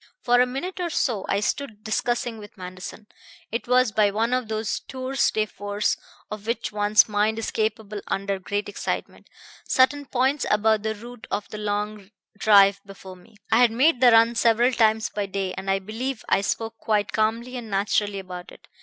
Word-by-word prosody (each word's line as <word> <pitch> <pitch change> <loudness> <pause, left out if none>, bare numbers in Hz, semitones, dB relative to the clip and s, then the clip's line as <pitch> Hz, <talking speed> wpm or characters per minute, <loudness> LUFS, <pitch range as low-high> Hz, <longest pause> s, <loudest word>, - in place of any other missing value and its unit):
"For 245 0 +4
a 250 - +3
minute 335 +10 -5
or 350 -1 -1
so 230 - -1
I 200 - +1
stood 215 -3 -3
discussing 235 +1 -1
with 205 -1 -13
Manderson 185 +3 -8 0.5
it 230 +2 -3
was 250 -2 +3
by 210 -1 +3
one 225 +4 0
of 255 -2 0
those 220 0 -2
tours 260 0 0
de 215 -1 0
force 205 0 -2 0.4
of 210 0 -7
which 235 0 -2
one's 210 0 +4
mind 210 +1 +1
is 225 - -3
capable 215 -1 -2
under 195 0 -2
great 205 +2 -3
excitement 205 - -5 0.4
certain 270 +2 +3
points 265 +3 +1
about 215 0 +3
the 220 +1 -2
route 240 +2 -11
of 205 - -3
the 215 - -7
long 210 -1 -3 0.3
drive 200 -2 +5
before 195 -1 -11
me. 185 +5 -20 0.2
I 225 - +5
had 245 -1 +6
made 255 +4 +2
the 250 - +8
run 230 +1 +6
several 235 +2 +3
times 220 -2 +2
by 205 -1 -3
day, 195 -1 -3
and 195 - -5
I 195 - +3
believe 225 +6 -5
I 195 - +3
spoke 225 +2 -3
quite 205 -3 0
calmly 230 +3 -1
and 240 -3 -6
naturally 200 0 0
about 180 -2 -8
it. - - -17
215 Hz, 190 wpm, -24 LUFS, 205-240 Hz, 0.5 s, the